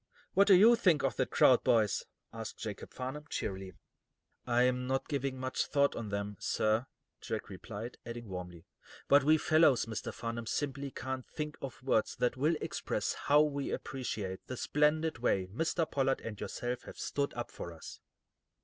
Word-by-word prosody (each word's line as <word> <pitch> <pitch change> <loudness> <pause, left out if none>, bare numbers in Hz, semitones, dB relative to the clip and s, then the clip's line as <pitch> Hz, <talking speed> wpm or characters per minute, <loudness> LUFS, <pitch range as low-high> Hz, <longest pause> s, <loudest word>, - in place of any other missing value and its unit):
"What 200 +1 +5
do 195 - +9
you 220 +6 +8
think 180 -10 +3
of 130 -5 +1
that - - +1
crowd, - - +5
boys?" 110 -3 +2 0.3
asked 115 -1 -6
Jacob 105 -3 -6
Farnum, 130 +4 -5
cheerily. 95 -1 -4 0.7
"I'm 125 +1 +2
not 135 0 -1
giving 140 -3 -2
much 130 0 -1
thought 140 0 +3
to - - -5
them, 100 -1 -4
sir," 110 +3 +1 0.3
Jack - - -4
replied, 115 +4 -7
adding 120 0 -7
warmly: 90 -3 -7 0.4
"But 140 -1 +6
we 155 +2 +5
fellows, 155 -5 +4
Mr. 110 -2 -4
Farnum, 115 0 -5
simply 140 +1 -2
can't 130 0 -5
think 150 -1 -5
of 130 -2 -7
words 115 -5 +1
that 125 0 +1
will 150 +6 +2
express - - -2
how 145 +1 +4
we 140 -2 -2
appreciate 105 -8 -4
the 130 - -5
splendid 150 +1 +1
way 95 -6 +1
Mr. 165 +5 0
Pollard 135 -2 +1
and 105 -3 -7
yourself 120 0 -3
have - - -10
stood 140 0 -1
up 120 0 -4
for 85 - -7
us." 80 -2 -10
130 Hz, 165 wpm, -32 LUFS, 110-145 Hz, 0.7 s, do